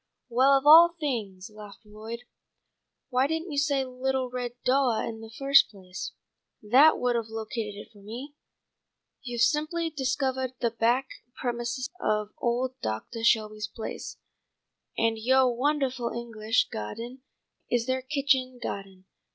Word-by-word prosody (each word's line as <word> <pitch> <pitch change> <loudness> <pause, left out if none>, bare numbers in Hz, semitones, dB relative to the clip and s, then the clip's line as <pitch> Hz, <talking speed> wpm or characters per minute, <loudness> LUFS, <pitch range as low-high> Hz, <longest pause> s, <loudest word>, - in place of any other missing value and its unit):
"Well, 265 +3 +5
of 270 - -4
all 335 +3 +9
things," 215 -10 -3
laughed 210 +1 -12
Lloyd, 220 +3 -8 0.9
"why 255 +1 +2
didn't 320 +2 -3
you 285 - 0
say 280 -2 +1
little 255 0 -2
red 245 -1 -4
doah 255 -3 +2
in 225 -1 -6
the 225 - -9
first 275 +4 +4
place. 185 -3 -8 0.5
That 260 +9 +5
would 245 -1 +1
have 230 -2 -1
located 220 -1 -4
it 205 - -11
for 205 -3 -18
me. 240 +8 -8 0.9
You've 240 -2 -1
simply 310 +5 +1
discovahed 265 -2 -1
the 235 - 0
back 235 +4 +1 0.3
premises 240 +1 -3
of 210 - 0
old 250 +2 -1
Doctah 110 - -4
Shelby's 215 -2 +2
place, 220 +1 -7 0.8
and 225 -1 +1
yoah 260 +3 +4
wondahful 260 -3 0
English 225 -1 0
gah'den 230 - -6 0.5
is 240 -1 +1
their 260 0 -1
kitchen 265 -2 0
gah'den. 195 -4 -6
245 Hz, 135 wpm, -27 LUFS, 220-265 Hz, 0.9 s, all